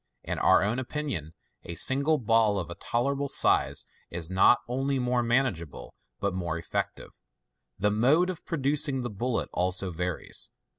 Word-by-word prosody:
In - - -3
our - - +4
own 110 +5 -1
opinion, 130 - -4 0.3
a 85 - -7
single 140 - +4
ball 115 -4 +2
of 90 -5 -4
tolerable 140 +4 -1
size - - +3 0.2
is 85 0 -3
not 95 +6 +5
only 135 +3 -1
more 125 -1 0
manageable, 120 - -1 0.3
but 100 -1 -1
more 85 -3 -3
effective. 85 - -4 0.7
The 105 +2 +1
mode 145 - +3
of 175 - -10
producing 145 -3 0
the 120 -2 -4
bullet 120 +4 -2
also 90 +1 0
varies. 90 +1 -2
120 Hz, 145 wpm, -27 LUFS, 95-135 Hz, 0.7 s, not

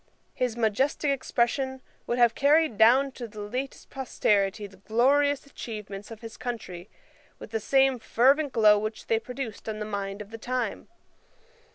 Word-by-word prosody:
His 245 -2 -2
majestick 265 +6 +1
expression 265 0 -1 0.3
would 240 - -1
have 240 -1 +5
carried 295 0 +3
down 255 +6 +5
to 245 -2 -7
the 215 -1 -11
latest 250 +6 -5
posterity 210 -6 0
the 195 -1 -13
glorious 275 +8 +2
achievements 210 -7 -8
of 225 -1 -10
his 225 -2 -9
country 200 -7 -6 0.5
with - - -11
the 225 - -1
same 265 +3 +3
fervent 275 +6 +3
glow 210 -3 +5
which 215 +1 -5
they 225 - +1
produced 245 -3 -6
on 215 - -4
the 210 - -4
mind 200 -1 -4
of 210 0 -9
the 225 - -8
time. 245 -2 -3
230 Hz, 160 wpm, -27 LUFS, 210-265 Hz, 0.5 s, have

